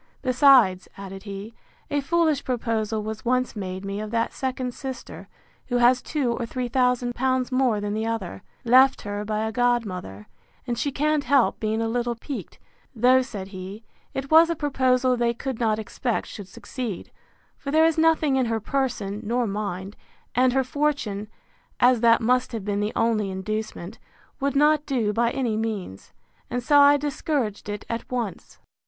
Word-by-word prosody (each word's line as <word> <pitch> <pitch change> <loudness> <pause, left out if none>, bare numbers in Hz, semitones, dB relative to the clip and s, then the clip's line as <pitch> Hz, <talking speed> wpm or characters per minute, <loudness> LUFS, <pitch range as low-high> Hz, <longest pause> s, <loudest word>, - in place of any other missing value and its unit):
Besides, 255 -8 +5
added 195 -1 -8
he, 200 +2 -7 0.4
a 290 0 +1
foolish 315 -1 +1
proposal 225 -3 -1
was 220 0 -5
once 255 0 0
made 190 -1 -5
me 200 +1 -4
of 215 - -5
that 230 +1 -1
second 255 -1 -3
sister, 265 -1 -8 0.4
who 245 - 0
has 245 +1 +4
two 275 -6 -1
or 235 0 -3
three 250 +1 -3
thousand 250 -1 +1
pounds 260 0 0
more 255 -4 +2
than 205 0 -3
the 220 +1 -2
other, 225 -5 -4 0.2
left 260 +3 +5
her 205 0 -4
by 215 +1 -2
a 220 - -2
godmother, 210 - -1 0.4
and 240 -1 -2
she 280 +4 -1
can't 300 +1 0
help 275 -4 +3
being 220 +1 -1
a - - 0
little 240 +1 -1
piqued; 270 +4 -7 0.4
though, 250 +3 +5
said 205 -7 -6
he, 195 +3 -8 0.3
it 270 +2 -4
was 325 +1 +7
a 335 - 0
proposal 260 -3 +2
they 235 -1 0
could 260 0 -4
not 220 -3 +1
expect 225 +2 -2
should 200 -3 -9
succeed; 225 +1 -6 0.4
for 280 - -7
there 315 +3 +4
is 325 -1 +3
nothing 320 -4 +3
in 255 -2 +1
her 225 -1 0
person 220 -5 -2
nor 240 +3 0
mind; 200 -2 -4 0.4
and 250 +1 +3
her 265 0 +2
fortune, 255 -7 -1 0.5
as 245 -2 +4
that 230 -1 +5
must 250 +2 +1
have 220 -4 -4
been 205 -1 -1
the 210 +1 -1
only 225 -3 +1
inducement, 210 +1 -5 0.4
would 280 0 -1
not 295 +1 +4
do 230 -7 0
by 235 +2 +2
any 240 -3 -1
means; 215 - -4 0.4
and 245 0 -2
so 290 +2 +5
I 285 0 +7
discouraged 280 -7 -2
it 205 0 -5
at 230 +1 -5
once. 235 -7 -4
240 Hz, 175 wpm, -24 LUFS, 215-265 Hz, 0.5 s, was